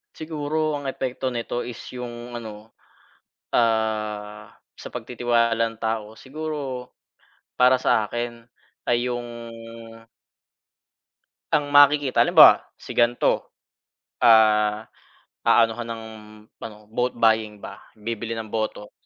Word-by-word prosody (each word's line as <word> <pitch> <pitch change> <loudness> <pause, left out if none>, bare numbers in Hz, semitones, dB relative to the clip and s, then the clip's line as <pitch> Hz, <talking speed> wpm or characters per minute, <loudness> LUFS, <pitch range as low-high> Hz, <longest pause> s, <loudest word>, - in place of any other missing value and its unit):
Siguro 155 -1 -2
ang 140 - -7
epekto 130 0 -3
nito 120 -1 -3
is 120 -1 -5 0.2
yung 120 -1 -7
ano, 110 0 -11 0.8
ah, 110 -2 -1 0.2
sa - - -10
pagtitiwala 120 -1 0 0.2
ng 110 - -15
tao, 110 -1 -3
siguro 140 -3 -6 0.7
para 125 +1 +6
sa 110 -4 +2
akin 120 0 -5 0.4
ay 120 +1 +1
yung 120 0 -4 2.3
ang 145 -1 +2
makikita 145 -1 +5
halimbawa, - - +7
si - - -10
ganto 120 0 +1 0.7
ah 110 -1 +4 0.6
aanuhan 115 0 +3
ng 115 -1 -6 0.6
ano 110 -2 -8
vote 125 +2 0
buying 110 -2 +2
ba, - - -10 0.2
bibili 115 +1 -4
ng 110 -1 -6
boto 110 -2 -3
120 Hz, 105 wpm, -23 LUFS, 110-125 Hz, 2.3 s, halimbawa